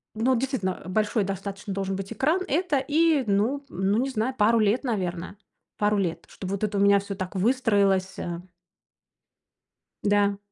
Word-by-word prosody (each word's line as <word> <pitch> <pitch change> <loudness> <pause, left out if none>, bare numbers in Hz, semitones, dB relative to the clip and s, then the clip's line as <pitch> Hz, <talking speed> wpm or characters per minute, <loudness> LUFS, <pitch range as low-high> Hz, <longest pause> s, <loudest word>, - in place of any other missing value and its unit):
ну, 250 +4 +2
действительно, 240 -8 -2
э, - - -7
большой 210 +2 +1
достаточно 195 +1 -5
должен 195 0 -2
быть 195 +3 -5
экран, 305 - +1
это 310 -1 +1
и, 300 +1 +2
ну 230 +8 +1
ну 190 +3 0
не 265 +3 +1
знаю, 245 +1 -1
пару 225 +1 +4
лет, 215 +5 +2
наверно, 185 -5 -3 0.4
пару 210 0 +2
лет, 175 -4 -2
чтобы 190 -1 -7
вот 200 - -3
это 205 -1 0
у - - +2
меня 200 0 +5
всё 200 0 -6
так 185 0 -5
выстроилося. 195 -6 +1 1.6
Да. 205 -1 +2
205 Hz, 160 wpm, -26 LUFS, 195-250 Hz, 1.6 s, меня